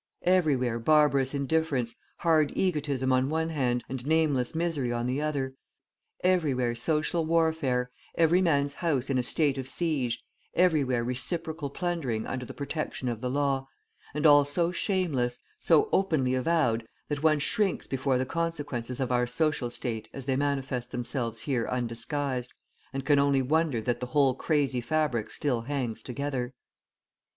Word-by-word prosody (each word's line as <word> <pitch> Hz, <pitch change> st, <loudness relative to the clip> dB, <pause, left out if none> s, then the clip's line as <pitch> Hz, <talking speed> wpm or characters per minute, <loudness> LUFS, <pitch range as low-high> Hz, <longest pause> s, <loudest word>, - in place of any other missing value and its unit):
Everywhere 140 Hz, -10 st, +2 dB
barbarous 140 Hz, 0 st, +3 dB
indifference, 140 Hz, -4 st, 0 dB, 0.2 s
hard 160 Hz, -3 st, +3 dB
egotism 145 Hz, -7 st, 0 dB
on 130 Hz, +1 st, +2 dB
one 160 Hz, +1 st, 0 dB
hand, 125 Hz, -6 st, 0 dB
and 130 Hz, -1 st, -5 dB
nameless 150 Hz, -4 st, +1 dB
misery 160 Hz, -7 st, -1 dB
on 120 Hz, 0 st, -1 dB
the 130 Hz, +4 st, -1 dB
other, 140 Hz, -3 st, -1 dB, 0.7 s
everywhere 145 Hz, -10 st, +2 dB
social 155 Hz, +7 st, 0 dB
warfare, 160 Hz, -6 st, +1 dB, 0.2 s
every 170 Hz, +2 st, +4 dB
man's 145 Hz, -5 st, +2 dB
house 140 Hz, -6 st, -1 dB
in 130 Hz, -, +2 dB
a -, -, +3 dB
state 140 Hz, +2 st, 0 dB
of 130 Hz, -, -5 dB
siege, 140 Hz, -9 st, -1 dB, 0.3 s
everywhere 145 Hz, -9 st, +3 dB
reciprocal 155 Hz, +5 st, -1 dB
plundering 140 Hz, -9 st, -2 dB
under 125 Hz, -2 st, -4 dB
the -, -, -8 dB
protection 140 Hz, -3 st, -3 dB
of 115 Hz, -2 st, -4 dB
the 125 Hz, -, -1 dB
law, 135 Hz, 0 st, 0 dB, 0.5 s
and 150 Hz, +1 st, -1 dB
all 145 Hz, -1 st, +8 dB
so 165 Hz, +5 st, 0 dB
shameless, 160 Hz, -11 st, 0 dB, 0.2 s
so 430 Hz, -, +4 dB
openly 155 Hz, -10 st, +2 dB
avowed 130 Hz, -4 st, +1 dB, 0.2 s
that 145 Hz, -1 st, -3 dB
one 155 Hz, -1 st, +4 dB
shrinks 195 Hz, +6 st, +1 dB
before 135 Hz, -1 st, 0 dB
the 130 Hz, -, 0 dB
consequences 145 Hz, -6 st, -3 dB
of 130 Hz, -2 st, -1 dB
our 125 Hz, 0 st, +2 dB
social 140 Hz, -1 st, 0 dB
state 115 Hz, -2 st, -4 dB
as 135 Hz, -, -7 dB
they 135 Hz, -1 st, +1 dB
manifest 135 Hz, -3 st, -1 dB
themselves 120 Hz, -2 st, -3 dB
here 125 Hz, -6 st, -1 dB
undisguised, 125 Hz, +2 st, -2 dB, 0.4 s
and 135 Hz, 0 st, -4 dB
can 145 Hz, 0 st, +4 dB
only 140 Hz, -1 st, +3 dB
wonder 155 Hz, -2 st, +1 dB
that 120 Hz, +2 st, -1 dB
the 125 Hz, -, -4 dB
whole 140 Hz, -1 st, +3 dB
crazy 140 Hz, -2 st, 0 dB
fabric 120 Hz, -4 st, 0 dB
still 130 Hz, -6 st, -1 dB
hangs 125 Hz, -3 st, -3 dB
together. 130 Hz, -1 st, -3 dB
140 Hz, 150 wpm, -28 LUFS, 125-155 Hz, 0.7 s, all